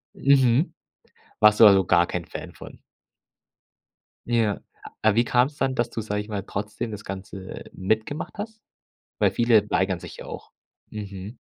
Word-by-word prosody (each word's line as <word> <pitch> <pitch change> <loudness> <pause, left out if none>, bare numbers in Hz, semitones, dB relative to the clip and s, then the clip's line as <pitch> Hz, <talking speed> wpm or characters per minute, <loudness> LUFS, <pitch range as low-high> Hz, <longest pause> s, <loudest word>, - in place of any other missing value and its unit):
Mhm. 135 +2 +3 0.7
Warst 105 0 +6
du 110 - +11
also 95 -2 +6
gar 85 -1 +4
kein 90 -2 -4
Fan - - -8
von? - - -12 1.5
Ja. 115 -4 +1 0.4
Aber 110 -1 +4
wie 120 - +4
kam 125 +1 +3
es 145 0 -14
dann, 135 -1 0
dass 120 -1 0
du, 115 - -4
sage 105 -1 -2
ich 105 - -10
mal, 100 -2 -3
trotzdem 105 +3 -5
das 105 0 -7
Ganze 95 0 -8
mitgemacht 110 +9 -2
hast? 220 +1 -7 0.6
Weil - - +3
viele 115 -3 +3
weigern 95 -2 +1
sich - - -10
ja - - -9
auch. - - -9 0.4
Mhm. 100 +1 -7
110 Hz, 160 wpm, -25 LUFS, 100-120 Hz, 1.5 s, du